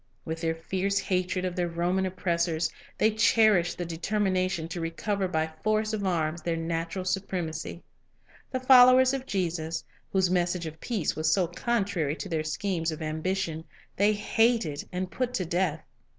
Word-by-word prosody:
With 160 Hz, 0 st, -4 dB
their 165 Hz, -1 st, 0 dB
fierce 190 Hz, +4 st, -1 dB
hatred 185 Hz, -1 st, 0 dB
of 180 Hz, -1 st, -3 dB
their 175 Hz, -1 st, 0 dB
Roman 175 Hz, +3 st, 0 dB
oppress 175 Hz, -2 st, 0 dB
ors, 160 Hz, 0 st, -1 dB, 0.3 s
they 220 Hz, -, +3 dB
cherished 215 Hz, -4 st, +4 dB
the 175 Hz, -, -3 dB
determination 185 Hz, 0 st, -1 dB
to 170 Hz, 0 st, -4 dB
recover 190 Hz, +4 st, -1 dB
by 160 Hz, -3 st, -1 dB
force 215 Hz, 0 st, +1 dB
of 210 Hz, -2 st, -2 dB
arms 170 Hz, -3 st, 0 dB
their 170 Hz, -1 st, -1 dB
national 165 Hz, +3 st, -3 dB
supremacy. 175 Hz, -3 st, -3 dB, 0.7 s
The 255 Hz, -, -2 dB
followers 255 Hz, 0 st, +7 dB
of 270 Hz, -1 st, -3 dB
Jesus, 165 Hz, -4 st, -2 dB, 0.3 s
whose 190 Hz, -2 st, +2 dB
message 175 Hz, -1 st, 0 dB
of 160 Hz, 0 st, -7 dB
peace 215 Hz, -, -1 dB
was 155 Hz, +1 st, +1 dB
so 190 Hz, -3 st, +3 dB
contrary 195 Hz, -5 st, -1 dB
to 195 Hz, -, -6 dB
their 160 Hz, -2 st, -1 dB
schemes 165 Hz, +1 st, -1 dB
of 155 Hz, 0 st, -6 dB
ambition, 160 Hz, +1 st, -2 dB, 0.3 s
they 205 Hz, +2 st, +3 dB
hated 215 Hz, -7 st, +1 dB
and 180 Hz, 0 st, -3 dB
put 250 Hz, +6 st, -2 dB
to 185 Hz, -, -1 dB
death. 170 Hz, -2 st, 0 dB
180 Hz, 165 wpm, -28 LUFS, 165-200 Hz, 0.7 s, followers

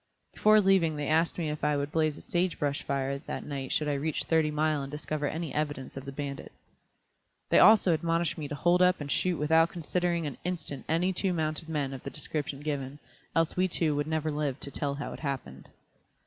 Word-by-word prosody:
Before 215 Hz, 0 st, +5 dB
leaving 190 Hz, -5 st, +3 dB
they 145 Hz, -1 st, -3 dB
asked 160 Hz, +3 st, +2 dB
me 160 Hz, -3 st, -1 dB
if 150 Hz, -, -6 dB
I 150 Hz, -1 st, +2 dB
would 140 Hz, +1 st, -2 dB
blaze 155 Hz, -2 st, +1 dB
a -, -, -12 dB
sage 180 Hz, 0 st, 0 dB
brush 145 Hz, -1 st, -1 dB
fire 140 Hz, 0 st, -2 dB
that -, -, -6 dB
night 140 Hz, -2 st, -5 dB
should 150 Hz, -, +1 dB
I 145 Hz, -, +1 dB
reach 150 Hz, +2 st, -1 dB
Thirty 160 Hz, -2 st, +2 dB
Mile 150 Hz, -1 st, +1 dB
and 135 Hz, -, -5 dB
discover 150 Hz, 0 st, -3 dB
any 160 Hz, -1 st, -4 dB
evidence 145 Hz, -3 st, -3 dB
of 135 Hz, 0 st, -7 dB
the 140 Hz, -, -5 dB
bandits. 140 Hz, 0 st, -7 dB, 0.8 s
They -, -, +5 dB
also 210 Hz, -5 st, +7 dB
admonished 165 Hz, 0 st, 0 dB
me 150 Hz, -2 st, -5 dB
to 145 Hz, -, -5 dB
hold 175 Hz, +4 st, +3 dB
up 180 Hz, 0 st, +4 dB
and 145 Hz, -1 st, -5 dB
shoot 180 Hz, -2 st, +1 dB
without 160 Hz, +3 st, +4 dB
considering 170 Hz, 0 st, -1 dB
an 145 Hz, -, -5 dB
instant 165 Hz, -6 st, -4 dB
any 175 Hz, +4 st, +2 dB
two 185 Hz, +1 st, 0 dB
mounted 160 Hz, 0 st, -2 dB
men 145 Hz, -4 st, -1 dB
of 130 Hz, -, -7 dB
the -, -, -6 dB
description 145 Hz, -2 st, -4 dB
given, 145 Hz, -2 st, -3 dB, 0.4 s
else 165 Hz, 0 st, +2 dB
we 185 Hz, +1 st, +2 dB
two 160 Hz, -4 st, 0 dB
would 145 Hz, +1 st, -1 dB
never 155 Hz, 0 st, -1 dB
live 145 Hz, -2 st, -2 dB
to 140 Hz, -, -4 dB
tell 140 Hz, -1 st, -1 dB
how 140 Hz, -, -5 dB
it -, -, -9 dB
happened. 130 Hz, -, -5 dB
155 Hz, 220 wpm, -29 LUFS, 145-165 Hz, 0.8 s, also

